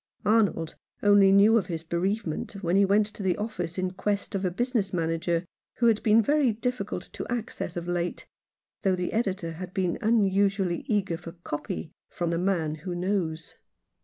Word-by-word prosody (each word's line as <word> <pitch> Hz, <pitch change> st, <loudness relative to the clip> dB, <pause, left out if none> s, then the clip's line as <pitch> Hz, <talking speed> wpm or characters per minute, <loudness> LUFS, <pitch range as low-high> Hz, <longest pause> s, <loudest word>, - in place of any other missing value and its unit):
Arnold 205 Hz, -7 st, +2 dB, 0.3 s
only 205 Hz, -1 st, +6 dB
knew 210 Hz, +4 st, +6 dB
of 190 Hz, -, -5 dB
his 165 Hz, -3 st, -4 dB
bereavement 175 Hz, +2 st, -2 dB
when 175 Hz, +1 st, +1 dB
he 200 Hz, 0 st, +5 dB
went 205 Hz, +2 st, +4 dB
to 210 Hz, 0 st, -8 dB
the 185 Hz, -2 st, +1 dB
office 185 Hz, -6 st, -4 dB
in 185 Hz, 0 st, -1 dB
quest 200 Hz, +3 st, -2 dB
of 195 Hz, -1 st, -1 dB
a 185 Hz, -, +2 dB
business 225 Hz, +1 st, -1 dB
manager 165 Hz, 0 st, 0 dB, 0.3 s
who 240 Hz, -, +1 dB
had 225 Hz, -2 st, +4 dB
been 220 Hz, +1 st, +5 dB
very 285 Hz, 0 st, +3 dB
difficult 215 Hz, -5 st, -4 dB
of -, -, -3 dB
access 230 Hz, -7 st, -4 dB
of 170 Hz, 0 st, -4 dB
late, 175 Hz, 0 st, -2 dB, 0.6 s
though 190 Hz, -1 st, +2 dB
the 180 Hz, -1 st, -3 dB
editor 190 Hz, -7 st, -1 dB
had 180 Hz, +3 st, -8 dB
been 185 Hz, -3 st, 0 dB
unusually 200 Hz, -4 st, +2 dB
eager 195 Hz, -6 st, 0 dB
for 165 Hz, 0 st, -9 dB
" 175 Hz, -, -31 dB
copy 150 Hz, +1 st, -4 dB
" -, -, -67 dB
from 170 Hz, -1 st, -1 dB
"The 170 Hz, -, 0 dB
Man 175 Hz, -5 st, 0 dB
who 180 Hz, 0 st, -4 dB
Knows." 175 Hz, -3 st, -2 dB
190 Hz, 185 wpm, -27 LUFS, 175-210 Hz, 0.6 s, only